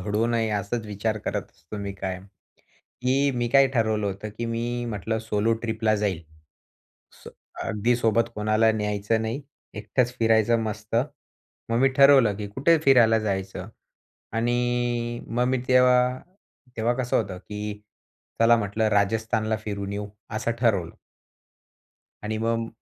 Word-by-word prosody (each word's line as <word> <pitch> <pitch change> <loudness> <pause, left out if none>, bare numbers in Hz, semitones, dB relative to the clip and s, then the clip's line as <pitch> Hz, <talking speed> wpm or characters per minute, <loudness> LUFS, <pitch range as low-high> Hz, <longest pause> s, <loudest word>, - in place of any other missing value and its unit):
घडू 105 +4 0
नये 115 -2 0
असाच 110 +4 -3
विचार 105 +1 -2
करत - - -3
असतो 85 +5 -11
मी 100 -1 -4
कायम, 95 -1 -5 0.8
की 135 +3 +2
मी 120 -1 -1
काय 135 +3 +6
ठरवलं 110 -3 +1
होतं, 100 +2 -4
की 120 - -2
मी 120 +1 -2
म्हटलं 110 +1 -2
सोलो 110 0 0
ट्रिपला 110 -1 0
जाईल. 100 -5 -1 1.0
सो - - -9 0.3
अगदी 115 +3 0
सोबत 115 -1 +2
कोणाला 110 +1 +2
न्यायचं 105 +1 -1
नाही, 115 +6 -3 0.3
एकटंच 120 +4 -1
फिरायचं 115 0 +3
मस्त. 110 0 -4 0.7
मग 115 - +2
मी 135 - +5
ठरवलं, 135 -7 +6
की 105 0 -5
कुठे 140 +10 +3
फिरायला 120 -5 +6
जायचं? 95 -3 -3 0.6
आणि 120 0 -1
मग 120 +2 0
मी 130 0 +1
तेव्हा 125 0 +4 0.6
तेव्हा 115 +2 +1
कसं 125 - 0
होतं, 95 -4 -6
की 105 +1 -7 0.6
चला 115 +1 +6
म्हटलं 110 +1 0
राजस्थानला 110 +2 +1
फिरून 100 -2 -4
येऊ, 100 0 -4 0.3
असं 115 +1 -1
ठरवलं. 100 -9 +1 1.3
आणि 110 +1 -3
मग 115 0 -1
110 Hz, 135 wpm, -25 LUFS, 105-120 Hz, 1.3 s, काय